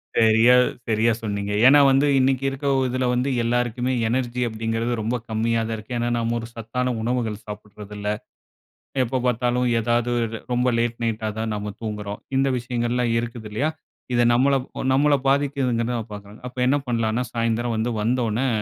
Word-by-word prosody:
சரியா, 115 +2 +5 0.3
சரியா 110 +1 +2
சொன்னீங்க. 100 -2 -3
ஏன்னா 140 +3 +8
வந்து, 135 +2 +4
இன்னைக்கு 130 0 +2
இருக்க 135 +1 -7
ஒ - - +2
இதுல 130 +1 -1
வந்து, 125 +2 0
எல்லாருக்குமே 120 +1 0
எனர்ஜி 125 +1 -1
அப்படிங்கறது, 115 +1 -2
ரொம்ப 115 +3 -1
கம்மியா 115 +1 0
தான் 115 - -2
இருக்கு. 110 +3 -7
ஏன்னா 120 0 0
நம்ம 115 0 0
ஒரு 115 - -7
சத்தான 125 +3 -2
உணவுகள் 115 -2 -1
சாப்புடறதில்ல, 105 0 -8 1.0
எப்போ 130 +2 -1
பாத்தாலும், 125 +1 +1
எதாவது 120 +1 +1 0.4
ரொம்ப 125 +1 +1
லேட் 120 0 0
நைட்டா 110 -1 -1
தான் 110 0 -2
நம்ம 105 0 -4
தூங்குறோம். 105 -2 -5 0.2
இந்த 135 +1 +3
விஷயங்கள்லாம் 120 0 -1
இருக்குது 115 -2 -6
இல்லையா? 140 +9 0 0.4
இது 120 0 +4
நம்மள 135 +4 +3 0.3
அ - - -1
நம்மள 145 +2 +4
பாதிக்குதுனு 135 -4 +1
நான் 115 -2 -5
பாக்குறேன். 105 +1 -10
அப்ப 125 - -11
என்ன 135 - +4
பண்ணலாம்னா, 115 0 0
சாயந்தரம் 115 0 0
வந்து, 110 +2 0
வந்தவோன்னே, 120 +2 0
120 Hz, 160 wpm, -23 LUFS, 110-125 Hz, 1.0 s, ஏன்னா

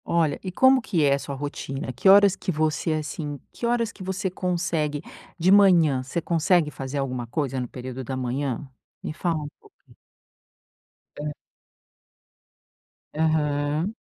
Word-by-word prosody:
Olha, 165 -3 +1
e 185 - -4
como 260 +6 +5
que 175 -8 0
é 140 -1 +4
a 140 - 0
sua 140 0 -6
rotina? 135 -2 -5
Que 135 +10 +3
horas 200 -1 +7
que - - -3
você, 155 0 0
assim, 150 -1 -4
que - - -5
horas 235 -2 +1
que - - -16
você 190 +1 -2
consegue 170 -5 -1 0.4
De 180 +2 +3
manhã? 175 -9 +5
Você 135 +6 -3
consegue 165 -1 +2
fazer 135 0 -5
alguma 130 -3 -3
coisa 135 0 -2
no 125 - -3
período 130 +1 -7
da 130 +1 -4
manhã? 130 +1 -2 0.4
Me - - -4
fala 170 +1 -1
um - - -5
pouco. - - -21 1.5
Hã. 150 0 -3 1.8
Aham. 150 +2 0
155 Hz, 150 wpm, -25 LUFS, 140-180 Hz, 1.8 s, horas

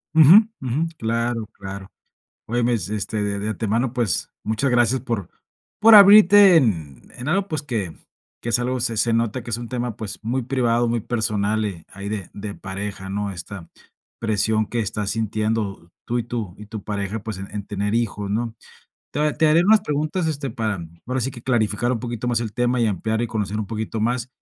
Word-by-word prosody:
Ujú, 160 +7 +9 0.2
ujú. 135 +6 -1
Claro, 115 -1 -1
claro. 95 -1 -8 0.6
Oye, 120 +1 0
mes 115 -7 0
este, 105 0 -2
de 100 0 -2
de 105 +2 -3
antemano, 115 +4 -1
pues, 115 -9 -1
muchas 110 +5 0
gracias 120 +1 +3
por 110 -7 -4 0.5
por 225 0 +8
abrirte 200 -2 +9
en 80 - +1
en 125 +4 -5
algo, 195 +4 +1
pues, 155 -2 -3
que 110 - -3 0.5
que 120 - -3
es 120 - +3
algo, 125 +1 -1
se 115 -2 -1
se 115 +2 +2
nota 115 +1 0
que 120 - -8
es 115 - -1
un 120 -1 -7
tema, 120 -3 -3
pues, 105 -2 -5
muy 125 +4 -1
privado, 120 -2 +1
muy 115 -1 0
personal, 110 -2 0
y 90 -6 -5
ahí 100 0 -7
de 105 -4 -4
de 100 0 -6
pareja, 95 0 -6
¿no? 100 +1 -2
Esta 85 -1 -8 0.5
presión 110 -1 +1
que 120 +2 -2
estás 105 -1 -2
sintiendo 110 -4 -2 0.2
tú, 120 +1 0
y 115 - -2
tú 115 -7 -4
y 105 - -10
tu 105 -2 -7
pareja, 100 +1 -3
pues, 110 -4 -5
en 95 - -7
en 105 -1 -4
tener 105 +1 -2
hijos, 105 -3 -1
¿no? 115 +1 -2 0.6
Te 145 - -2
ha 150 -1 +1
te 160 0 +3
haré 160 +3 +5
unas 215 +1 +6
preguntas, 155 +1 -1
este, 145 -4 -2
para 110 -2 -2 0.3
ahora 130 +1 -1
sí 130 +3 -1
que 120 -1 -11
clarificar 120 -1 +1
un 115 - -2
poquito 120 -1 -4
más 120 -1 +1
el 110 -3 -4
tema, 120 +1 +1
y 115 - +3
ampliar, 110 +4 -1
y - - 0
conocer 105 -2 -2
un 105 - -4
poquito 110 0 -4
más. 120 +2 0
115 Hz, 205 wpm, -22 LUFS, 105-125 Hz, 0.6 s, Ujú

